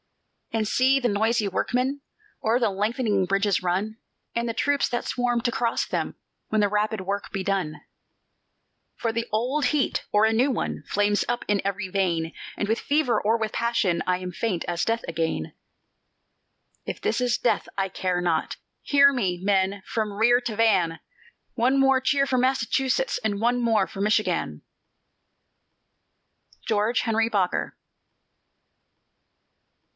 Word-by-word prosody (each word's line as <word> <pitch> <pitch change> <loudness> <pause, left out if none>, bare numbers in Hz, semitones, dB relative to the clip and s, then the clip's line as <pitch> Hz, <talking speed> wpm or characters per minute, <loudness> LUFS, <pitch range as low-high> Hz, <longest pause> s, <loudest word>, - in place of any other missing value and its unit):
"And 220 -1 0
see 265 +4 +3
the 245 - +1
noisy 220 +1 +1
workmen 255 +8 -1 0.4
O'er 225 +2 +2
the 230 -4 +1
lengthening 210 0 0
bridges 195 +1 +1
run, 195 +5 -1 0.4
And 235 0 -1
the - - -1
troops 285 +4 +1
that 240 - -2
swarm 245 -1 0
to 240 0 0
cross 235 0 0
them - - -3 0.3
When 215 - +1
the 205 - +4
rapid 210 0 -1
work 200 +2 -4
be 195 - -3
done. 190 -6 -2 1.2
"For 230 -2 -1
the 230 +1 -2
old 250 +7 0
heat, 280 +2 +1
or 210 +1 +4
a 220 - +2
new 255 +5 +3
one, - - -3
Flames 205 0 +1
up 240 0 -2
in 205 -1 +1
every 200 -1 -2
vein; 175 -4 -1 0.2
And 205 - -1
with 225 +2 0
fever 285 -4 +1
or 220 +2 +2
with 220 -1 -3
passion 230 -7 +1
I 180 0 +2
am 180 0 -6
faint 185 -4 -2
as 175 0 -1
death 230 +4 -1
again. 160 - -2 1.3
"If - - -5
this 230 +3 -1
is 245 -1 +1
death, 240 - 0
I 195 0 +1
care 185 -1 -2
not! 170 -3 -1 0.2
Hear 280 0 +5
me, 190 -9 0
men, 195 0 +1
from 215 -2 -2
rear 240 +4 +4
to 235 -3 -4
van! 190 -7 +2 0.5
One 255 +3 +2
more 270 -1 +4
cheer 275 +1 +2
for 260 -2 +1
Massachusetts, 265 - +1
And 205 -2 -1
one 240 +2 +1
more 225 -4 +2
for 195 - -7
Michigan!" 210 +1 0 2.0
GEORGE 220 +2 +1
HENRY 225 0 +1
BOKER. 195 -5 -1
220 Hz, 150 wpm, -25 LUFS, 195-245 Hz, 2.0 s, Hear